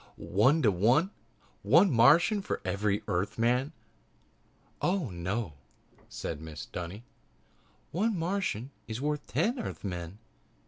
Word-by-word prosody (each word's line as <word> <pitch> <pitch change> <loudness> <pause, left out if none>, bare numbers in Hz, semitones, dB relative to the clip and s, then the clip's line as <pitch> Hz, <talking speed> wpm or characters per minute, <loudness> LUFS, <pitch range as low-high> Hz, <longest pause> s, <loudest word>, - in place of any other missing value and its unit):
"One 135 +11 +2
to 105 - +5
one? 120 - +3 0.5
One 165 - +5
Martian 150 - +5
for - - -3
every 100 +2 0
Earthman?" 120 - 0 1.1
"Oh, 175 - 0
no," 90 +2 -3 0.6
said 75 - -5
Mrs. 80 -2 -9
Dunny, 90 +6 -6 0.9
"one 210 +4 0
Martian 165 - -2 0.2
is 110 +1 -4
worth 150 +1 -2
ten 245 +4 0
Earthmen. 90 - -5
120 Hz, 105 wpm, -30 LUFS, 100-165 Hz, 1.1 s, to